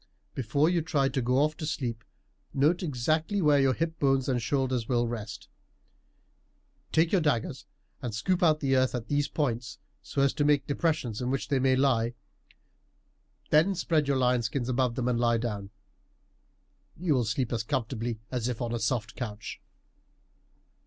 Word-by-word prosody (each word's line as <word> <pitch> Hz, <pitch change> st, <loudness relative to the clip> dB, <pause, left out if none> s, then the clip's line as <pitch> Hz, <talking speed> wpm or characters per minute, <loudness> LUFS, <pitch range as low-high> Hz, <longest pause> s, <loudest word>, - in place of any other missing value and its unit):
Before 135 Hz, +5 st, +1 dB
you 175 Hz, -1 st, +2 dB
try 150 Hz, -5 st, +1 dB
to 135 Hz, -1 st, -1 dB
go 125 Hz, +2 st, +1 dB
off 150 Hz, +2 st, +2 dB
to 155 Hz, -, -4 dB
sleep 120 Hz, -7 st, -3 dB, 0.5 s
note 150 Hz, +6 st, +3 dB
exactly 155 Hz, +5 st, 0 dB
where 150 Hz, -5 st, +4 dB
your 135 Hz, -2 st, +3 dB
hip 165 Hz, -1 st, -2 dB
bones 135 Hz, -2 st, +2 dB
and 125 Hz, -3 st, +1 dB
shoulders 130 Hz, -2 st, -1 dB
will 120 Hz, -1 st, +2 dB
rest; 110 Hz, -3 st, -6 dB, 1.4 s
take 160 Hz, +1 st, +3 dB
your 190 Hz, -, +3 dB
daggers 145 Hz, -8 st, -1 dB, 0.3 s
and 115 Hz, -4 st, -4 dB
scoop 175 Hz, +11 st, 0 dB
out 155 Hz, -3 st, +4 dB
the 135 Hz, -2 st, +2 dB
earth 130 Hz, 0 st, +2 dB
at 120 Hz, -2 st, -5 dB
these 145 Hz, 0 st, +1 dB
points 125 Hz, -4 st, -2 dB, 0.2 s
so 140 Hz, -, -1 dB
as 140 Hz, -, +3 dB
to 145 Hz, -, 0 dB
make 145 Hz, -1 st, +3 dB
depressions 140 Hz, -7 st, -1 dB
in 125 Hz, -, -1 dB
which 135 Hz, +1 st, -2 dB
they 140 Hz, -2 st, +2 dB
may 130 Hz, 0 st, +3 dB
lie. 125 Hz, -3 st, +2 dB, 1.4 s
Then 170 Hz, +6 st, +4 dB
spread 160 Hz, -4 st, +1 dB
your 140 Hz, -1 st, +2 dB
lion 125 Hz, -1 st, +2 dB
skins 120 Hz, +3 st, -2 dB
above 125 Hz, -1 st, +1 dB
them 125 Hz, -1 st, -1 dB
and 120 Hz, -2 st, +1 dB
lie 120 Hz, -1 st, +3 dB
down. 105 Hz, -4 st, -4 dB, 1.3 s
You 170 Hz, -2 st, +1 dB
will 125 Hz, -3 st, +2 dB
sleep 115 Hz, +3 st, -1 dB
as 115 Hz, -, 0 dB
comfortably 115 Hz, 0 st, -2 dB
as 125 Hz, -2 st, -1 dB
if 125 Hz, -3 st, -3 dB
on 120 Hz, -1 st, -2 dB
a 120 Hz, -, -1 dB
soft 110 Hz, -1 st, -1 dB
couch." 110 Hz, -4 st, -6 dB
130 Hz, 175 wpm, -28 LUFS, 120-150 Hz, 1.4 s, where